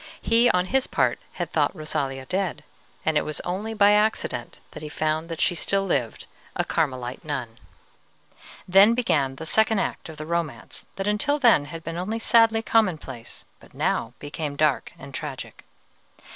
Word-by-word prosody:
He 230 +2 +4
on 180 0 +2
his 265 +6 +1
part - - +1
had - - -4
thought - - +1
Rosalia 135 -3 -3
dead, 180 -3 -2 0.4
and 155 -1 +3
it - - -1
was 155 -1 -3
only 205 +5 -3
by 205 -1 +6
accident 210 - 0
that - - -9
he 155 - -6
found 155 +2 -1
that 165 -1 -5
she - - +3
still 195 +3 +1
lived, 130 - -1 0.3
a - - 0
Carmelite 130 -5 -2
nun. 130 -7 -5 1.1
Then 195 +5 +6
began 145 - +1
the 160 - -7
second 220 +5 +3
act 190 - -2
of 160 - -10
the 155 - -6
romance 155 -10 -4
that 195 - -3
until 210 +8 +1
then 235 - +5
had 165 +2 -8
been 165 0 -5
only 200 +6 -2
sadly 225 -1 +4
commonplace, 155 - -1
but - - -19
now 115 - -1
became 145 0 -5
dark 150 -2 +1
and 135 +1 -11
tragic. 140 -2 -7
165 Hz, 170 wpm, -25 LUFS, 145-210 Hz, 1.1 s, by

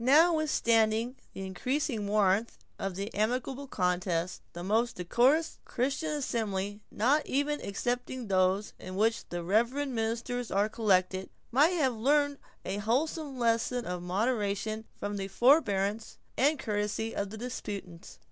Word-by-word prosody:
Notwithstanding 250 -6 +3 0.2
the 195 - -5
increasing 235 - -2
warmth 205 +1 +2 0.2
of 195 -2 -3
the 200 +3 -4
amicable 250 +6 -1
contest, 180 -4 -1
the 175 - -6
most 225 +5 +1
decorous 250 - +2
Christian 275 +5 -1
assembly, 210 -8 -2
not 280 +8 +2
even 285 +2 0
excepting 245 +4 -3
those 190 +1 +2
in 185 0 -7
which 225 +3 +2
its - - -10
reverend 235 +11 +1
ministers 230 +1 -2
are 200 +2 +2
collected, 190 -4 +1 0.2
might 300 +9 +4
have 265 -5 +2
learned 285 +5 +2 0.3
a 195 - -2
wholesome 270 +6 -1
lesson 235 +1 +1
of 180 -1 -3
moderation 215 +2 -1
from 205 0 -3
the 195 -1 -3
forbearance 215 -3 +2 0.2
and 290 +4 +3
courtesy 210 -1 -2
of 200 -1 -2
the 220 - -8
disputants. 200 -7 -7
225 Hz, 130 wpm, -30 LUFS, 200-260 Hz, 0.3 s, might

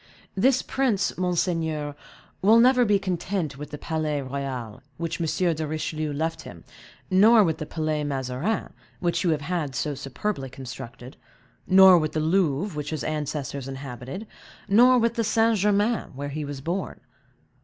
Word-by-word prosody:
This 255 +6 +3
prince, 245 -7 0
monseigneur, 165 -4 -1 0.5
will 220 +4 +6
never 250 +1 +5
be 205 -2 +4
content 180 -5 -3
with 150 - -7
the 150 - -7
Palais 155 -2 -2
Royal, 130 -4 -5 0.2
which 170 +1 -3
M. 170 +2 +1
de 155 0 -3
Richelieu 155 0 -3
left 160 +3 -2
him, - - -11 0.5
nor 215 +4 +7
with 165 -4 -1
the 155 - -5
Palais 155 -1 -2
Mazarin, 140 - -2 0.3
which 175 -2 0
you 180 - +2
have 155 -2 +1
had 150 -4 -3
so 150 +4 -1
superbly 135 +2 -4
constructed, 125 0 -9 0.5
nor 190 -1 +8
with 155 -1 -2
the 155 - 0
Louvre, 160 +1 +1
which 150 -1 -4
his 155 -3 -3
ancestors 145 -3 -3
inhabited; 135 - -7 0.4
nor 245 +5 +6
with 230 0 +1
St. 225 +1 +3
Germain, 210 +3 +1
where 145 +1 -4
he 150 +1 -4
was 140 -1 -6
born. 175 +6 -3
160 Hz, 155 wpm, -25 LUFS, 145-195 Hz, 0.5 s, nor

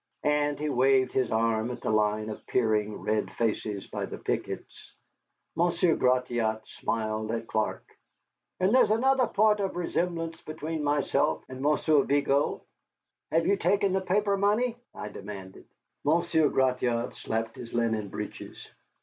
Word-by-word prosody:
And 150 0 +1
he 150 - -2
waved 130 -1 +3
his 130 -3 0
arm 110 0 +1
at 125 - -6
the - - -1
line 110 0 +1
of 105 - -10
peering 110 -3 0
red 105 0 0
faces 105 -3 -2
by - - -4
the - - -7
pickets. - - -5 0.6
Monsieur 170 0 +2
Gratiot 120 -3 +1
smiled 110 -1 -2
at 115 0 -2
Clark. 110 -1 -2 0.7
"And 185 +4 +2
there's 260 - +5
another 255 +3 +3
point 210 0 +3
of 195 -1 -2
resemblance 170 -1 -2
between 155 0 -4
myself 145 -1 +1
and 130 0 -7
Monsieur 150 +1 +3
Vigo." 140 0 +1 0.7
"Have 165 0 +2
you 200 - +3
taken 200 0 +2
the 190 - +1
paper 200 +2 +1
money?" 215 +5 +2 0.2
I 105 - -6
demanded. 100 -2 -9 0.4
Monsieur 160 0 +3
Gratiot 125 -2 +1
slapped 115 0 -3
his 115 - -9
linen 115 -3 0
breeches. - - -7
135 Hz, 140 wpm, -28 LUFS, 110-170 Hz, 0.7 s, there's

